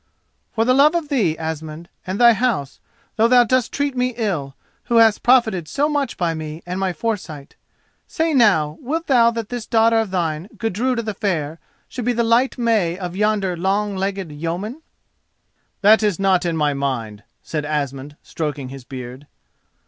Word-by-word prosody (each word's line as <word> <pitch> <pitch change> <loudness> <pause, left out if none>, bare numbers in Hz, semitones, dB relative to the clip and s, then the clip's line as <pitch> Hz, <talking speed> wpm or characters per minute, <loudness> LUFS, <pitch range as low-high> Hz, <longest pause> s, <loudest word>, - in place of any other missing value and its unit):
"For 225 0 +2
love 280 +6 +4
of 325 -4 -2
thee, 200 - +1
Asmund, 160 +1 -6 0.2
and 185 +2 -3
thy 240 -1 +7
house, 215 - -1 0.4
though 225 +1 +4
thou 245 0 +6
dost 255 0 +1
treat 285 -1 -2
me 250 -1 -1
ill, 165 - -2 0.3
who 235 - -1
hast 225 -2 +5
profited 225 -9 +3
so 285 - 0
much 290 -4 -2
by 170 -3 0
me 155 0 -7
and 180 +2 -4
my 190 -1 0
foresight. 180 -9 -5 0.5
Say 325 -1 -1
now: 170 - +3
wilt 320 +6 -3
thou 240 -4 +4
that 230 -2 -5
this 245 -2 -5
daughter 225 0 +3
of 220 -2 -1
thine, 170 -1 -2
Gudruda 230 +2 -1
the 215 -1 -3
Fair, 165 -7 -2 0.3
should 250 -3 -6
be 245 - +2
the 235 0 +1
light 235 +3 +2
May 215 -8 +1
of 180 -2 -6
yonder 205 -3 0
long 195 +3 -1
legged 190 -3 -3
yeoman?" 175 - -5 1.0
"That 215 +2 +6
is 210 -4 +1
not 190 -2 +2
in 165 -1 -1
my 150 -2 +1
mind," 120 -7 -3 0.2
said 150 -2 -3
Asmund, 145 -1 -3
stroking 145 -5 -4
his 135 -1 -9
beard. 130 +2 -9
195 Hz, 170 wpm, -20 LUFS, 155-235 Hz, 1.0 s, thy